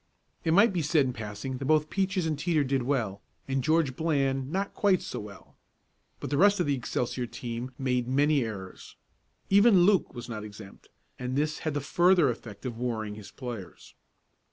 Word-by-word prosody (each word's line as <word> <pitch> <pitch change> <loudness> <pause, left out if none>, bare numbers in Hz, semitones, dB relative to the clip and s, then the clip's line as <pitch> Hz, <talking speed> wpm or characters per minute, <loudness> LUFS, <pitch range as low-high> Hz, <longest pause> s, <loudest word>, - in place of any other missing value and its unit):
It 160 - +1
might 205 +2 +5
be 175 - 0
said 150 -1 +3
in 125 - -2
passing 110 +4 -5
that 135 - -4
both 155 +1 +2
Peaches 190 -2 0
and 160 - 0
Teeter 155 0 +1
did 135 -1 0
well, 120 -7 -1 0.3
and 135 -1 -1
George 155 -3 +2
Bland 135 -3 0
not 195 +3 -2
quite 195 -3 +3
so - - -6
well. 105 -2 -11 0.6
But - - -6
the 140 - +1
rest 200 +1 +5
of 175 - +2
the 145 - +1
Excelsior 125 -1 -2
team 120 +1 -5
made 125 -3 0
many 140 +1 +3
errors. 95 -5 -8 0.6
Even 200 -1 +6
Luke 190 -6 +3
was 120 -1 -7
not 110 -3 -5
exempt, 105 -2 -12 0.3
and 125 +1 -3
this 150 +2 0
had 155 -2 -3
the 145 - 0
further 175 0 +4
effect 110 -2 -10
of 120 -2 -5
worrying 110 -4 -2
his 105 -1 -10
players. 120 -8 -8
135 Hz, 185 wpm, -28 LUFS, 120-160 Hz, 0.6 s, Even